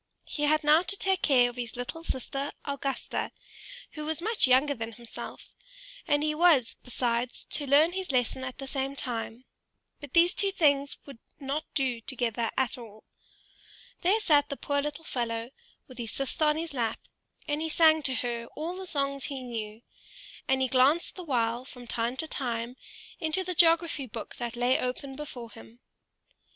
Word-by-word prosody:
He 295 - -1
had 305 +1 +3
now 305 +2 +6
to 400 +2 +1
take 385 -1 +2
care 250 -4 +5
of 245 0 -7
his 240 -2 -4
little 245 +7 -5
sister 275 -1 -3
Augusta, 280 -2 -2 0.6
who 305 - -6
was 315 +1 -2
much 420 - +2
younger 265 +3 +4
than 225 -2 -5
himself, 235 +1 -9 0.5
and 290 0 +3
he 305 0 +1
was, 305 -7 +4
besides, 245 0 -2
to 290 - 0
learn 295 +5 +6
his 375 -3 -3
lesson 255 0 0
at 255 -1 -5
the 270 - -6
same 270 +1 -2
time; 240 -1 -4 0.5
but 290 -3 -10
these 345 +1 +6
two 395 -1 +2
things 285 -6 +2
would 275 -5 -11 0.2
not 285 +3 -2
do 255 -5 +1
together 235 -2 -1
at 260 0 +1
all. 220 -2 -12 1.0
There 390 +5 +3
sat 300 -9 +4
the 280 - -4
poor 285 0 0
little 295 +2 -5
fellow, 230 -2 -2 0.4
with 255 -2 -13
his 230 -2 -2
sister 275 +3 0
on 300 0 +3
his 325 -1 -3
lap, 235 -4 -1 0.5
and 295 +1 -1
he 320 - -1
sang 315 -1 +5
to 265 -3 +1
her 235 -1 -2
all 330 +4 -3
the 375 0 -3
songs 275 -3 +2
he 270 -3 -4
knew; 225 -2 -6 0.6
and 265 0 +3
he - - +2
glanced 265 +6 +3
the 365 - -8
while 240 -5 0
from 250 -2 -11
time 235 +2 -2
to 320 - -2
time 240 -4 -3 0.4
into 320 +2 +1
the 365 0 -3
geography 330 -4 +3
book 225 -1 -8
that 240 -1 -4
lay 245 +2 +2
open 265 +2 -3
before 250 -5 -7
him. 115 - -14
270 Hz, 180 wpm, -29 LUFS, 245-310 Hz, 1.0 s, now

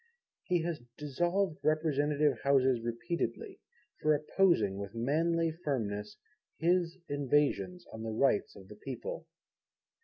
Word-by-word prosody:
He 175 -3 +1
has 165 -4 -3 0.2
dissolved 175 +5 0
Representative 150 -1 +2
Houses 130 -3 +3
repeatedly, 115 +2 -3 0.4
for 155 0 +4
opposing 145 - +2
with 100 +2 -6
manly 165 +7 +1
firmness 110 -10 -3 0.4
his 175 +1 +1
invasions 145 +5 +1
on 110 - -7
the 110 - -3
rights 110 0 +1
of 95 -1 -13
the 105 +1 -12
people. 130 +2 -6
145 Hz, 115 wpm, -32 LUFS, 115-165 Hz, 0.4 s, for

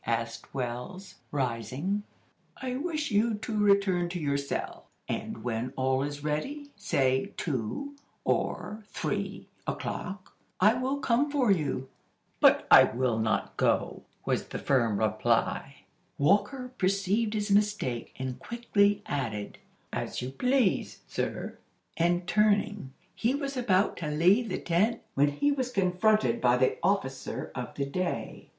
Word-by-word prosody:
asked 115 0 -2
Wells, 135 +10 -5 0.2
rising. 130 - -1 0.6
"I 255 -1 -3
wish 305 -1 -2
you 215 +2 +3
to 215 +1 -5
return 200 -4 +3
to 175 0 -4
your 140 -3 0
cell, 140 0 -3 0.2
and - - -4
when 120 +2 -2
all 130 0 +1
is 145 +1 -4
ready, 280 - -3
say 135 -3 +1
two 155 - -3 0.3
or 215 +1 -1
three - - -3 0.2
o'clock, 195 -1 -5 0.2
I 210 +4 +6
will 255 +3 -1
come 275 +2 +2
for 270 -7 +2
you." 140 -7 0 0.5
"But - - +5
I - - +11
will 120 -1 0
not 110 -2 0
go!" - - +1 0.2
was - - 0
the - - -5
firm 115 -6 +2
reply. 110 0 0 0.3
Walker 210 - +2
perceived 200 +3 +1
his 205 -1 -1
mistake, 205 - +1
and 130 -1 -4
quickly 205 -3 +1
added: 110 -8 -3 0.3
"As - - -3
you 125 +1 -4
please, 250 - +1
sir." - - -4 0.4
And 175 +1 +1
turning, 205 -5 +2 0.2
he 240 +4 +1
was 280 -1 -3
about 205 -6 +2
to 165 - -4
leave 180 +10 +3
the 185 - -1
tent, 185 +7 +1
when 140 +2 +4
he 215 - +1
was 260 -3 -1
confronted 200 +2 +2
by 125 0 +4
the 130 +1 +2
"officer 170 -8 -1
of 125 -2 -6
the 140 - -1
day." 180 +6 -3
185 Hz, 135 wpm, -29 LUFS, 135-215 Hz, 0.6 s, I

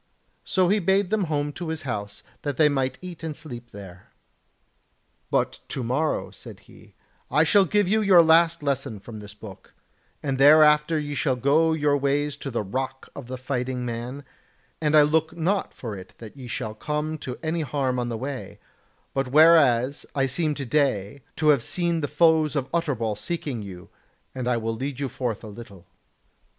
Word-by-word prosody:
So 185 -1 +1
he 210 +2 +3
bade 190 +1 +1
them 215 -3 +1
home 145 -2 -1
to 175 +2 -6
his 160 -1 -4
house 105 -6 -5 0.2
that 145 -2 -3
they 155 -2 +5
might 130 -2 -1
eat 180 -3 -8
and 160 -2 -4
sleep 120 -7 -9
there. 95 -4 -12 1.2
"But - - 0
to 130 - -4
morrow," 135 +7 -1
said - - -11
he, - - -19 0.3
"I 150 +4 +4
shall 195 +4 +4
give 205 +2 +1
you 220 +3 +2
your 190 -5 +7
last 165 0 +4
lesson 135 -6 -2
from 110 +2 -10
this 105 -1 -11
book, 105 -2 -13 0.5
and 135 -2 -2
thereafter 150 +2 +6
ye 145 -1 -3
shall 135 -1 0
go 150 +6 +3
your 150 -2 +2
ways 145 +1 0
to 140 - -6
the 120 -4 -2
Rock 130 +6 -4
of 140 -4 -8
the 130 +1 -5
Fighting 125 -1 -3
Man, 120 +4 -5 0.6
and 155 0 +3
I 150 - +8
look 160 +2 +1
not 190 +5 0
for 115 -5 -7
it 95 -1 -11
that 110 +1 -11
ye 130 -3 -9
shall 110 -2 -4
come 150 +7 -3
to 125 -3 -6
any 160 +1 -1
harm 130 -3 -1
on 120 -1 -2
the 115 - -3
way; 135 +2 -6 0.6
but 135 -1 -1
whereas 140 -3 +4
I 135 -1 +2
seem 150 +3 -1
to 140 - -5
day 130 -3 0
to 155 -1 +2
have 140 -5 +5
seen 170 +5 -1
the 145 - -1
foes 155 0 +3
of 135 -2 -2
Utterbol 130 -11 -1
seeking 140 - -4
you, 90 -3 -10 0.5
I 125 -2 0
will 115 0 -2
lead 135 +3 -5
you 140 -2 -2
forth 120 -3 -4
a - - -8
little." 100 -4 -11
140 Hz, 185 wpm, -25 LUFS, 125-155 Hz, 1.2 s, I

